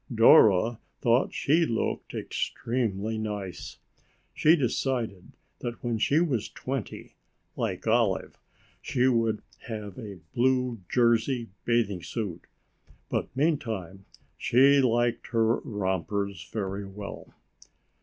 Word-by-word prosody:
Dora 110 -1 +6 0.2
thought 120 +3 +2
she 160 +4 +2
looked 115 -8 -2
extremely 110 -3 -2
nice. 105 -4 -5 0.6
She 155 +2 +5
decided 120 - -2 0.3
that 120 -1 -6
when 120 -2 -1
she 145 +7 +3
was 140 -11 0
twenty, 130 -4 -5 0.4
like 90 - -3
Olive, 110 -4 +1 0.5
she 125 +1 +1
would 115 -4 +1 0.2
have 105 -3 -6
a 105 -5 -7 0.2
blue 125 -1 +1
jersey 120 0 +2 0.2
bathing 110 -6 +1
suit. 95 -4 -5 0.6
But - - -1
meantime 110 - -1 0.3
she 135 +3 +5
liked 120 -1 +1
her 115 -1 +2
rompers 100 -1 -3
very 100 -2 -3
well. 100 +1 -9
115 Hz, 105 wpm, -27 LUFS, 100-125 Hz, 0.6 s, Dora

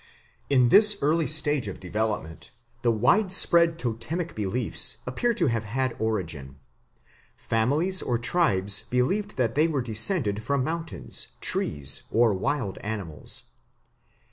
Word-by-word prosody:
In 130 -3 +4
this 210 - +7
early 155 +2 +2
stage 150 -5 +1
of 100 - -7
development 100 -3 -3 0.3
the 120 - +2
widespread 170 - +3
totemic 155 +7 -4
beliefs 110 +3 0
appear 185 - -1
to 175 - +1
have 115 -5 0
had 130 +3 -2
origin. 85 -12 -3 0.8
Families 150 +12 0
or 120 - -1
tribes 105 - +2
believed 195 +13 -1
that 120 -3 0
they 155 +4 +3
were 145 -6 -1
descended 110 - 0
from 135 +4 -1
mountains, 165 +3 -4
trees, 70 -3 -1
or 115 -2 +3
wild 100 +1 -2
animals. 100 -8 -5
125 Hz, 120 wpm, -26 LUFS, 105-160 Hz, 0.8 s, this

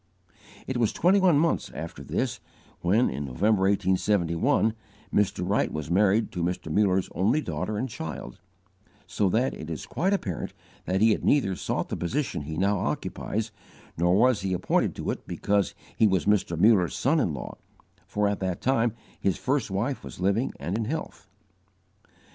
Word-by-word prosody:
It 130 - -3
was 115 -3 +2
twenty 190 +3 +4
one 180 -6 +5
months 165 +3 +1
after - - -6
this, - - -2 0.4
when, 105 +8 +3
in 70 +3 -3
November, 95 - +2
1871, 100 - +2 0.4
Mr. 95 -3 +1
Wright 100 +3 +1
was 75 +1 -4
married 105 +4 +3
to 90 - -4
Mr. 85 -2 -2
Muller's 95 0 +2
only 110 - +2
daughter 110 -7 -3
and 125 +5 -1
child, 80 -9 -7 0.7
so 95 +3 0
that 120 +7 +1
it 80 - -8
is 80 - -5
quite 185 +4 0
apparent 95 - -2 0.3
that 95 +2 0
he 110 +1 +6
had - - 0
neither 110 -10 +3
sought - - -2
the - - -2
position 125 - -2
he 80 +2 -6
now 100 +2 +2
occupies, 110 +4 -3 0.4
nor 90 +2 +3
was 125 +1 +4
he 95 -1 -1
appointed 90 - +1
to - - -2
it - - -7
because 100 -2 0 0.2
he 110 - +4
was 95 -2 +1
Mr. 100 -5 +2
Muller's 95 -2 +4
son 155 +5 +2
in 95 - +1
law, 65 - -7 0.5
for, 105 +1 0
at 100 0 -1
that 95 -2 -2
time, 120 -4 +1 0.3
his 95 - 0
first 135 -4 0
wife 115 +8 -2
was - - -9
living 100 +7 +1
and 90 - -3
in 110 0 -1
health. 130 -6 -5
100 Hz, 170 wpm, -27 LUFS, 90-115 Hz, 0.7 s, he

